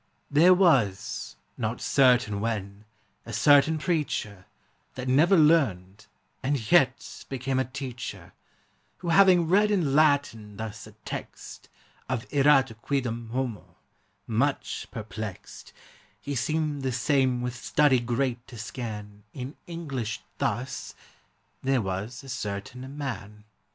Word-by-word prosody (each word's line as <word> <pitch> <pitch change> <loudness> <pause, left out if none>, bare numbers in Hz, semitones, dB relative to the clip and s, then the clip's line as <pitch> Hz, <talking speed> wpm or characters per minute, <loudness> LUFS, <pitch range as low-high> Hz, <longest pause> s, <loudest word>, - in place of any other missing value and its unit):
There 170 +6 +6
was 120 - +1 0.2
(not 115 +1 -2
certaine 125 -6 +3
when) 105 -2 -4 0.4
a 115 - -9
certaine 145 +7 +5
preacher, 145 - -2 0.5
That 130 0 -5
never 160 +9 +5
learned, 110 - +2 0.3
and 130 -5 -2
yet 135 -7 +2
became 130 0 -1
a 130 - +1
teacher, 130 -2 -7 0.6
Who 175 - -5
having 180 -1 +6
read 205 +5 +4
in 175 -10 +1
Latine 140 -9 +2
thus 110 -1 -6
a - - -14
text - - -8 0.4
Of 125 -3 -2
erat 135 -5 +3
quidam 120 -5 -2
homo, 125 -3 -4 0.5
much 135 +6 -1
perplext, 110 -4 -8 0.5
He 145 - -5
seemed 150 +2 -1
the 130 -1 -1
same 130 0 +1
with 125 -1 -2
studie 130 +5 +3
great 120 0 -1
to 120 - -11
scan, 105 -2 -7
In 130 +2 -6
English 140 -10 -4 0.2
thus, - - -3 0.7
There 135 0 +2
was 105 +5 -4
a 135 - -11
certaine 125 +5 -5
man. 105 -7 -6
130 Hz, 120 wpm, -27 LUFS, 110-145 Hz, 0.7 s, There